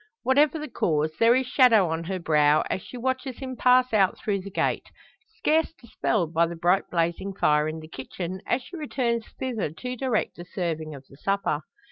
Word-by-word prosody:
Whatever 290 +4 +3
the 305 0 -5
cause, 155 - 0
there 230 +1 +6
is 260 0 +1
shadow 245 -7 +5
on 165 +1 -3
her 190 +2 -2
brow, 150 -3 +3
as 185 - -1
she 250 - -10
watches 260 +1 -2
him 260 -2 -6
pass 250 0 +4
out 195 -3 +3
through 200 -2 -2
the 200 - -8
gate; 195 - -1 0.5
scarce 320 -6 +1
dispelled 215 - -2
by 170 +1 +3
the 170 - -6
bright 175 +3 +1
blazing 170 +3 -1
fire 150 -3 +2
in 155 +1 -4
the 155 - -10
kitchen, 175 +6 -6
as 250 +1 0
she 360 - -11
returns 240 -7 -1
thither 245 - -2
to 250 - -6
direct 250 -3 -1
the 175 - -7
serving 160 -4 -4
of 135 -1 -12
the 135 - -17
supper. 195 -3 -1
195 Hz, 195 wpm, -26 LUFS, 165-255 Hz, 0.5 s, there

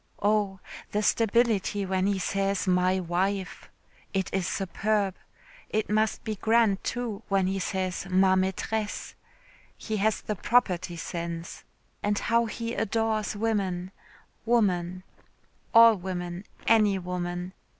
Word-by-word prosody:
Oh! 205 -2 +1 0.3
the 210 +1 +1
stability 220 -3 +2
when 190 0 0
he 200 -1 +1
says 195 +1 0
'my 185 +1 +2
wife.' 190 +2 -2 0.5
It 190 -1 -1
is 190 -2 0
superb. 200 +1 0 0.6
It 215 -1 -1
must 215 0 +1
be 215 -1 -3
grand, 220 -2 +3
too, 235 -4 -3
when 195 -1 +2
he 190 +1 -1
says 185 0 -2
'ma 190 0 +4
maitresse'; 200 +3 -2 0.6
he 220 -1 -3
has 215 +2 +1
the 210 - -3
property 185 -5 +1
sense. 170 0 -5 0.4
And 205 0 0
how 230 +2 +2
he 230 +1 -4
adores 220 -2 0
women, 195 -4 -1 0.5
woman, 185 -6 +1 0.7
all 230 -1 +8
women, 180 0 -5 0.2
any 210 -3 +4
woman. 180 0 -4
195 Hz, 120 wpm, -27 LUFS, 185-215 Hz, 0.7 s, all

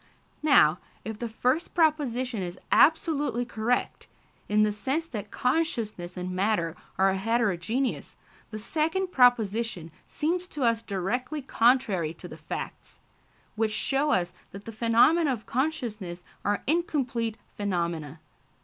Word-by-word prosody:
Now, 195 - +5 0.3
if 220 -1 -5
the 235 - -3
first 255 +8 0
proposition 260 - +1
is 180 0 -5
absolutely 295 -6 +3
correct, 235 +1 -1 0.4
in 210 +1 +4
the 210 - +2
sense 270 +10 -1
that 210 -9 -6
consciousness 230 - -1
and 180 0 -4
matter 185 -3 0 0.2
are 190 0 +4
heterogeneous, 225 +3 -1 0.3
the 215 - -6
second 320 - -1
proposition 225 - +2 0.2
seems 350 +4 -1
to 295 -6 -4
us 230 -1 +2
directly 240 - -3
contrary 225 - +2
to - - -9
the - - -9
facts, - - -7 0.6
which 220 0 +1
show 275 +6 +1
us 180 -8 +1 0.2
that 200 +1 -9
the 225 - -6
phenomena 240 +8 +4
of 230 -4 -4
consciousness 225 - -3 0.2
are 205 0 0
incomplete 260 -8 0 0.2
phenomena. 170 -6 -2
230 Hz, 125 wpm, -27 LUFS, 195-275 Hz, 0.6 s, Now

